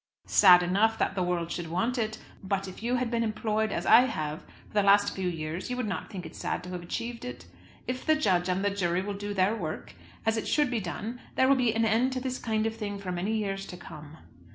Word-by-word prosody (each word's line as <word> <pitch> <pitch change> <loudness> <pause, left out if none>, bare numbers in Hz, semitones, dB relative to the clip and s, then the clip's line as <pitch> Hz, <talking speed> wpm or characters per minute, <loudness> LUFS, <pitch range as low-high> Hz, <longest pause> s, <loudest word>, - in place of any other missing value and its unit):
"Sad 180 -3 +7
enough, 210 +5 +2
that - - 0
the 190 - -1
world 175 -2 -1
should 175 -2 -3
want 225 +10 -1
it. 220 -1 -1 0.2
But 195 0 -2
if 190 - -9
you 240 +2 0
had 245 -2 -1
been 235 -1 +1
employed 220 -1 0
as - - -2
I 225 +2 +8
have 155 - -3 0.3
for - - -22
the 210 - +4
last 200 0 +4
few 190 -1 -2
years, 165 +2 -4
you 250 - -2
would 250 - -1
not 185 -5 -4
think 185 -5 -7
it 160 - -9
sad - - -3
to 180 - -8
have 180 -1 -4
achieved 230 +7 -5
it. 250 - -7 0.4
If 255 0 -3
the 315 - +5
judge 185 -11 +1
and 185 +2 0
the 200 - +2
jury 185 -2 0
will 205 +1 -3
do 205 +1 -5
their 190 +3 +3
work 160 - -5 0.3
as 225 0 +2
it 220 - -3
should 295 -4 +2
be 240 - 0
done 215 +6 -5
there 260 - +4
will 275 - +6
be 245 -4 +1
an 225 0 +2
end 235 +4 +2
to 255 - -1
this 255 0 -3
kind 220 -1 0
of 225 0 -1
thing 205 -2 -4
for 195 -2 -5
many 190 +5 -1
years 195 -2 -2
to 180 - -8
come. 155 -2 -11
205 Hz, 255 wpm, -28 LUFS, 180-230 Hz, 0.4 s, I